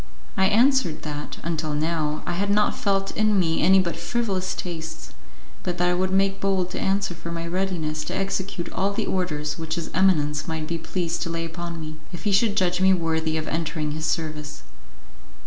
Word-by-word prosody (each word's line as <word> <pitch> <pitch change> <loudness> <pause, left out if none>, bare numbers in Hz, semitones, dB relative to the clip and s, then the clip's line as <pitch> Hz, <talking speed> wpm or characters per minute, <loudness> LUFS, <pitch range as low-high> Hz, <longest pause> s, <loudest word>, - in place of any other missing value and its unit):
I 190 0 +4
answered 230 - +3
that, 150 -1 -5
until 155 -2 -1
now, 155 -1 0
I - - -2
had 195 +4 0
not 210 +1 +3
felt 195 -1 0
in 215 -2 +3
me 165 -3 +2
any 190 +1 +6
but 185 -3 +2
frivolous 195 -6 -1
tastes, 160 -2 -6 0.5
but 180 -1 -2
that 180 0 +3
I - - +3
would 185 +1 +1
make 195 +1 +2
bold 190 -2 +1
to - - -3
answer 195 -1 +1
for 170 0 -7
my 165 0 -3
readiness 170 -4 -1
to - - -3
execute 195 -2 -2
all 195 +1 +1
the - - -1
orders 150 -5 -1
which 160 0 -2
his 170 -2 -4
eminence 150 -6 +2
might 160 -1 -2
be 165 +1 -3
pleased 170 0 -2
to - - -1
lay 165 0 -2
upon 170 0 -5
me, 155 0 -6
if 175 - -7
he 205 - +1
should 205 +1 +3
judge 180 0 +2
me 190 0 +6
worthy 160 -2 0
of 155 - -3
entering 155 -2 -1
his 155 +1 -2
service. 150 - -3
170 Hz, 200 wpm, -25 LUFS, 160-190 Hz, 0.5 s, any